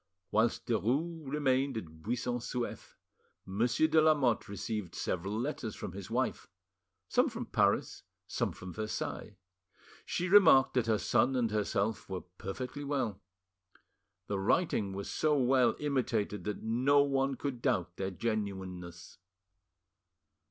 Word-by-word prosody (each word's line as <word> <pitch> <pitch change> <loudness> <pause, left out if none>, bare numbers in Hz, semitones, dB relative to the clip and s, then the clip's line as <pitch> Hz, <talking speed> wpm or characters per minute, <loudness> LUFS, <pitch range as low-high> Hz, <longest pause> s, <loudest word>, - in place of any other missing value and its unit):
Whilst 110 +2 +2
Derues 135 - -1
remained 135 -3 +1
at 80 -6 -8
Buisson 120 +4 -2
Souef, 120 0 -5 0.5
Monsieur 115 +10 +1
de 160 0 +4
Lamotte 140 -9 +3
received 100 -3 -4
several 100 +5 -2
letters 120 -4 -3
from - - -6
his 95 0 -8
wife, - - -1 0.6
some - - +3
from - - -5
Paris, - - +1 0.2
some - - -1
from 90 -1 -9
Versailles. 110 -1 -4 0.7
She 180 - -2
remarked 170 -9 +7
that 125 -3 +1
her 110 -1 +3
son 120 +5 +2
and 120 -4 +1
herself 105 0 -1
were 95 -2 -3 0.2
perfectly 125 +8 -5
well.... 130 -8 -2 1.0
The 100 -1 -2
writing 105 - +1
was 100 +1 -5
so 150 -1 +1
well 130 -1 +4
imitated 115 -9 -1
that 105 -1 -4
no 130 +6 +4
one 135 -1 +1
could 130 -2 -4
doubt 90 -4 0
their 95 0 -2
genuineness. 95 -5 -4
115 Hz, 130 wpm, -32 LUFS, 100-135 Hz, 1.0 s, remarked